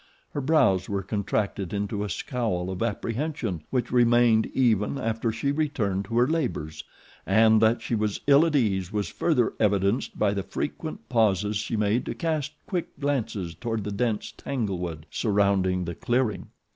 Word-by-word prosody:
Her 145 - -3
brows 130 - +3
were 100 -1 -1
contracted 100 -2 -2
into 100 0 -2
a 105 - -4
scowl 95 -3 -2
of 95 - -5
apprehension 115 - -2
which 125 -2 -1
remained 120 -2 +4
even 115 -1 +1
after 115 -1 -1
she 115 +6 -1
returned 120 -11 -1
to 115 +3 -3
her 120 +1 +5
labors, 80 - -2 0.4
and 110 +2 +4
that 115 +1 +3
she - - -3
was 105 -2 0
ill 140 +2 +6
at 155 - -1
ease 95 -8 +1
was 105 -4 -2
further 125 -9 +1
evidenced 100 +2 +1
by 100 - +2
the 100 - -1
frequent - - -5
pauses 105 -2 +2
she 105 +2 -2
made 105 +3 +1
to - - -3
cast 155 -3 -2
quick 180 -4 -4
glances 115 - -2
toward 115 +4 -3
the 105 - -4
dense 110 0 -1
tanglewood 90 - -4
surrounding 100 -4 +1
the 85 - -4
clearing. 120 -2 -1
110 Hz, 160 wpm, -26 LUFS, 100-125 Hz, 0.4 s, ill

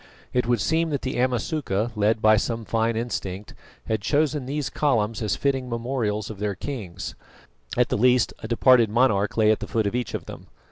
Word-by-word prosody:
It 125 -1 +1
would 120 -2 +2
seem 160 - +1
that 145 -3 -2
the 130 - -2
Amasuka, 125 - 0
led 110 +1 +1
by 110 0 +7
some 115 +1 -2
fine 115 +1 0
instinct, 105 -4 -4 0.3
had 110 -2 -1
chosen 145 +2 0
these 145 +1 -2
columns 115 -7 0
as 110 - 0
fitting 135 -2 -1
memorials 115 -3 -2
of 100 - -10
their 105 -1 -2
kings, 95 -7 -6 0.6
at 125 -1 +3
the - - 0
least 125 0 +3
a - - -7
departed 120 -1 +5
monarch 110 -3 +2
lay 110 -1 +5
at 110 - +1
the - - -6
foot 110 -2 0
of 100 - -1
each 125 0 -2
of - - -5
them. - - -10
115 Hz, 195 wpm, -24 LUFS, 105-130 Hz, 0.6 s, by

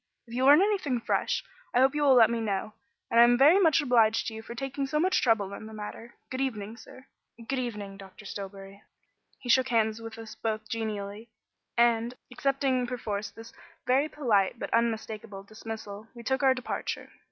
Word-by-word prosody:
If 235 - -13
you 255 +2 +1
learn 295 +6 +8
anything 370 - 0
fresh, - - 0 0.3
I - - +5
hope 265 +1 +4
you 295 - -1
will 275 -3 +6
let 230 -2 +6
me 235 -1 -1
know; 210 0 -2 0.4
and 230 - +4
I - - +10
am 240 0 +5
very 300 +9 +6
much 325 -4 +4
obliged 230 -5 +3
to 225 - -4
you 220 - -7
for 235 +1 -9
taking 270 +2 -3
so 300 +2 0
much 370 +4 +2
trouble 210 -5 +2
in 215 - -8
the 220 - -10
matter. 215 +3 -8 0.2
Good 260 +1 -2
evening 220 -5 -3
sir. 260 +2 -14 0.4
Good 270 -1 -1
evening, 210 -5 -5
Dr. 195 +2 -13
Stillbury." 195 0 -8 0.6
He - - -11
shook 260 +1 +5
hands 220 -2 +1
with 225 0 -8
us 225 -1 -9
both 215 -1 -3
genially, 220 -1 -4 0.5
and, 235 0 +3 0.2
accepting 265 -1 0
perforce 215 -4 -3
this 225 0 -13 0.3
very 270 +4 +2
polite 230 -9 +1
but - - -5
unmistakable 220 -3 -1
dismissal, 215 0 -8
we 235 - -10
took 265 +3 0
our 265 -1 +4
departure. 255 - -4
230 Hz, 190 wpm, -28 LUFS, 215-260 Hz, 0.6 s, I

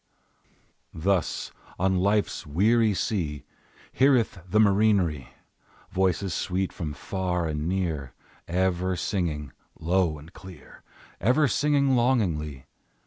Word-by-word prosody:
Thus, 95 +2 -1 0.3
on 95 0 +1
Life's 100 -1 0
weary 105 +7 +3
sea, 85 - -2 0.5
Heareth 130 -7 +3
the 105 - +1
marinere 100 - +3 0.6
Voices 95 0 0
sweet, 95 0 -2
from 75 -4 -5
far 90 +2 -2
and 75 0 -2
near, 80 -8 -2 0.3
Ever 95 +1 0
singing 80 -6 -2 0.3
low 85 -1 +1
and 75 +4 -14
clear, 95 -6 -13 0.4
Ever 130 - +3
singing 140 -1 +2
longingly. 85 - 0
95 Hz, 100 wpm, -26 LUFS, 80-105 Hz, 0.6 s, weary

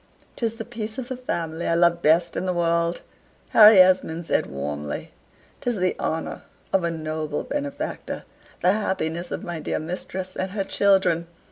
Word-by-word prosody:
"'Tis 230 -2 -1
the 225 -1 -6
peace 225 -2 -5
of 255 -1 -5
the 260 - -3
family 170 -9 -3
I 165 - +2
love 170 0 +3
best 165 +3 +3
in 185 - -2
the 180 - +1
world," 170 0 +1 0.5
Harry 215 -1 +9
Esmond 180 -3 +4
said - - +1
warmly 75 +1 -5 0.5
"'tis 245 -1 0
the 185 -2 0
honor 160 +1 -3 0.3
of 190 - +3
a 170 - +1
noble 155 -2 -3
benefactor 285 -1 -4 0.4
the 180 - +5
happiness 175 -4 -1
of - - -4
my 175 -2 -4
dear - - -2
mistress 185 +3 -5
and 185 0 -3
her 200 -2 0
children. 190 -4 +2
175 Hz, 165 wpm, -24 LUFS, 165-200 Hz, 0.5 s, Harry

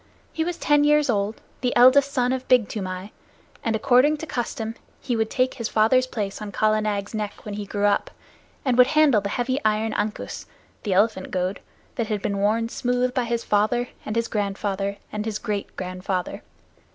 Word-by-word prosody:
He 320 - 0
was 345 +1 -3
ten 295 0 +3
years 295 -2 +4
old, 205 0 -1 0.2
the 250 - 0
eldest 265 +3 +6
son 250 -1 +1
of 260 0 -4
Big 250 -5 +4
Toomai, 185 -1 -5 0.5
and, 225 -1 0
according 260 +6 +4
to 320 - -6
custom, 230 -5 -3 0.3
he 245 - -2
would 220 -1 0
take 255 -1 +1
his 230 -3 -4
father's 255 +4 +3
place 210 -5 -4
on 210 -1 -5
Kala 215 +2 +2
Nag's 205 -1 -2
neck 210 -1 -5
when 210 - -5
he 205 0 -5
grew 205 0 -1
up, 205 - +2 0.6
and 255 -2 +2
would 250 - +8
handle 300 -6 +4
the 200 - -3
heavy 255 +5 -1
iron 215 +1 +1
ankus, 210 +1 -3 0.3
the 205 - -1
elephant 200 0 +2
goad, 185 +1 -2 0.4
that 230 - -1
had 210 -2 -2
been 200 -1 -1
worn 220 +3 +1
smooth 250 +1 0
by 250 -2 0
his 235 0 -1
father, 220 +4 +1
and 215 - -4
his 230 0 +1
grandfather, 200 -1 -2
and 210 0 -3
his 220 -2 -2
great 210 -3 -4
grandfather. 185 0 -3
220 Hz, 190 wpm, -24 LUFS, 205-250 Hz, 0.6 s, would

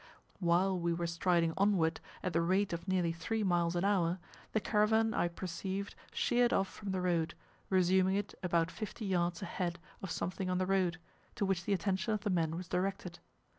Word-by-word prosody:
While 180 +1 +2
we 170 0 +1
were 170 +1 -2
striding 170 0 +2
onward, 190 -5 +2 0.2
at 185 - -1
the 165 - +3
rate 185 +3 +2
of 170 +2 -5
nearly 180 -3 +2
three 210 +7 -2
miles 175 -2 +2
an 175 +2 +1
hour, 180 -3 +2 0.3
the 220 - +2
caravan 220 +1 +2
I - - +2
perceived 190 +3 -4 0.2
sheered 240 0 +2
off 195 - +2
from 205 +1 -8
the 190 -1 -1
road, 170 -3 0 0.3
resuming 185 0 +3
it 205 0 -2
about 170 -2 +1
fifty 215 0 -6
yards 175 -1 0
ahead 175 -2 -2 0.2
of 195 - -5
something 185 +2 -2
on 180 - +1
the 185 - +1
road, 185 -2 +1 0.4
to 205 - 0
which 185 -2 0
the 205 - +1
attention 190 +3 0
of 210 - -4
the 205 - -1
men 165 -3 +1
was 180 0 -6
directed. 180 -1 -2
185 Hz, 190 wpm, -33 LUFS, 170-195 Hz, 0.4 s, the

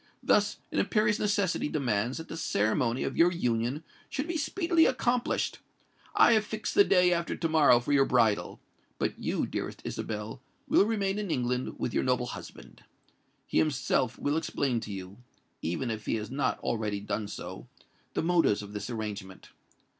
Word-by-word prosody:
Thus 205 0 +3
an - - 0
imperious 210 -1 +2
necessity 200 -7 +1
demands 120 -4 0
that 160 +1 -7
the - - -6
ceremony 115 -4 0
of - - -3
your 175 +1 +5
union 125 -2 -1 0.3
should 280 +3 -3
be 340 - -3
speedily 330 +2 +2
accomplished. 250 -1 0 0.6
I - - +7
have 215 -1 +3
fixed 215 0 -4
the 405 - +7
day 180 - +4
after 170 0 -1
to 165 - -1
morrow 155 -6 +5
for 120 - -4
your 135 -1 +5
bridal:—but 115 -6 -1
you, - - -1
dearest - - -4
Isabel, 110 +3 -5 0.3
will - - +5
remain 200 -2 0
in 205 -3 -3
England 125 -3 -1
with 120 - -3
your - - +1
noble 125 -1 +1
husband. 120 - -10 0.6
He - - +1
himself 135 -4 +1
will 145 +2 0
explain 135 -6 0
to 105 - -7
you—even 100 +1 -6
if 110 -1 -6
he - - +1
has 110 +1 -5
not 140 +1 0
already 105 -3 -1
done 105 +1 -3
so—the 100 - -8
motives 165 -12 +2
of 100 0 -10
this 105 +2 -5
arrangement. 105 -5 -6
135 Hz, 160 wpm, -29 LUFS, -, 0.6 s, I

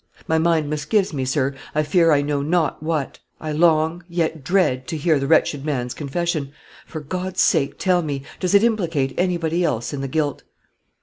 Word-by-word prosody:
My 160 0 +2
mind 160 -2 +2
misgives 155 +7 0
me, 135 -3 -2
sir, 135 +1 0 0.2
I 155 - +2
fear 165 +1 +3
I 145 -1 +3
know 145 -1 -1
not 160 +1 0
what. 155 -3 -2 0.2
I 155 - -4
long, 160 +1 +2
yet 165 -3 -2
dread, 150 -8 +1
to 160 - -3
hear 155 -1 +2
the 140 - -2
wretched 145 -2 +2
man's 125 -5 -2
confession. 150 -1 -3 0.3
For 155 - -6
God's 185 +4 -1
sake 150 -7 +1
tell 180 -2 +2
me, 145 -4 -4 0.2
does 185 +1 +1
it 200 - +6
implicate 170 -12 0
anybody 175 -1 0
else 120 -5 -1
in 140 - -3
the 135 - -3
guilt?" 145 0 -1
155 Hz, 185 wpm, -21 LUFS, 145-175 Hz, 0.3 s, it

